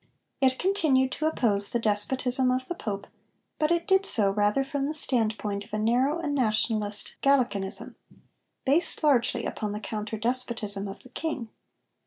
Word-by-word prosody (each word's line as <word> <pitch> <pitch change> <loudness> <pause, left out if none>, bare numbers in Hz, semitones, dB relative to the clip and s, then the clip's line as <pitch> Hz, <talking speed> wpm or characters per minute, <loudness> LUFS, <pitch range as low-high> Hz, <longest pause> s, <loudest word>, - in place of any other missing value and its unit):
It 260 -1 +4
continued 310 -9 +2
to 310 - -1
oppose 205 -9 +1
the - - 0
despotism 250 +4 +1
of 255 0 -1
the - - -3
Pope, 205 - -5 0.5
but 305 - +2
it 340 +1 0
did 385 -1 +4
so 200 -3 +2
rather 210 +6 +1
from 275 0 -2
the 310 - -4
standpoint 215 -7 +2
of - - -19
a - - 0
narrow 245 +8 +2
and 310 -4 -3
nationalist 215 -4 0
Gallicanism, 245 -9 +1 0.7
based 300 +4 +1
largely 240 -5 +2
upon 210 -1 -3
the 210 - -4
counter 215 +1 -5
despotism 225 -4 -1
of 195 0 -9
the 255 - -15
King. 270 -4 -4
245 Hz, 160 wpm, -27 LUFS, 210-275 Hz, 0.7 s, It